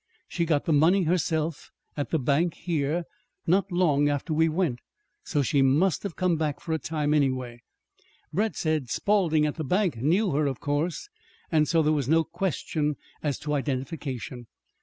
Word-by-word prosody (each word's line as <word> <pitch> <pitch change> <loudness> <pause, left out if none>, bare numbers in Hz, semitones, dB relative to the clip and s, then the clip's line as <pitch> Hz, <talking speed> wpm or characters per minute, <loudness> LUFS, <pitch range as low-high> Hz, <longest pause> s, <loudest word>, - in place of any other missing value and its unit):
She 170 - -1
got 150 -3 +1
the 160 - +2
money 170 +6 +4
herself, 160 -2 -1 0.3
at 145 - -3
the 160 - +1
bank 145 +5 +1
here, 165 0 -1 0.4
not 190 +3 +2
long 150 -5 +3
after 145 +3 -2
we 160 +1 +3
went. 155 -7 0 0.4
So 145 - 0
she 135 +2 +2
must 150 +8 +3
have 200 -5 -5
come 180 -3 +1
back 155 -2 -1
for 160 - -4
a 160 - 0
time, 150 -2 -1
anyway. 130 -5 0 0.7
Brett 210 +6 0
says 155 -6 -1
Spawlding, 175 -7 +2
at 150 - -2
the 160 - -2
bank, 180 - +1
knew 180 - +2
her, 145 +1 +1
of 135 -3 -3
course, 155 - -2 0.4
and 155 -2 +3
so 165 -2 +3
there 155 +1 +3
was 140 -4 -1
no 165 +1 +4
question 160 -3 -2 0.3
as 145 -3 -1
to 150 0 -2
identification. 135 -3 -4
155 Hz, 175 wpm, -26 LUFS, 145-170 Hz, 0.7 s, money